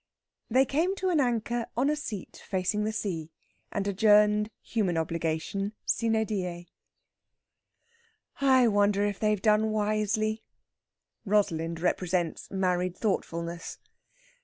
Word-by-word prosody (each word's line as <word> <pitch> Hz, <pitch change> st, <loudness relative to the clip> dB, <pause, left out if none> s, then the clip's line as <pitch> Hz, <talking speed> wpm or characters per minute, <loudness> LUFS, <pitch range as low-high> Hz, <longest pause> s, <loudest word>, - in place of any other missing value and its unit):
They 260 Hz, +4 st, +4 dB
came 330 Hz, +8 st, 0 dB
to 375 Hz, -1 st, -1 dB
an 335 Hz, -4 st, +2 dB
anchor 235 Hz, -2 st, 0 dB
on 260 Hz, +3 st, +2 dB
a 300 Hz, -, +2 dB
seat 225 Hz, -, -7 dB
facing 195 Hz, +2 st, 0 dB
the 215 Hz, -, 0 dB
sea, 170 Hz, -7 st, -3 dB, 0.4 s
and 200 Hz, -1 st, -2 dB
adjourned 210 Hz, +1 st, +4 dB
human 195 Hz, -7 st, -1 dB
obligation 165 Hz, +5 st, -2 dB
sine 225 Hz, -1 st, +1 dB
die. 180 Hz, -5 st, -4 dB, 1.7 s
"I 260 Hz, -3 st, +5 dB
wonder 205 Hz, -1 st, +3 dB
if 205 Hz, -1 st, -2 dB
they've 210 Hz, -1 st, +1 dB
done 215 Hz, +2 st, +3 dB
wisely." 215 Hz, +1 st, 0 dB, 0.8 s
Rosalind 165 Hz, -6 st, 0 dB
represents 175 Hz, -1 st, -1 dB
married 185 Hz, -2 st, 0 dB
thoughtfulness. 170 Hz, -5 st, -3 dB
210 Hz, 110 wpm, -28 LUFS, 180-220 Hz, 1.7 s, I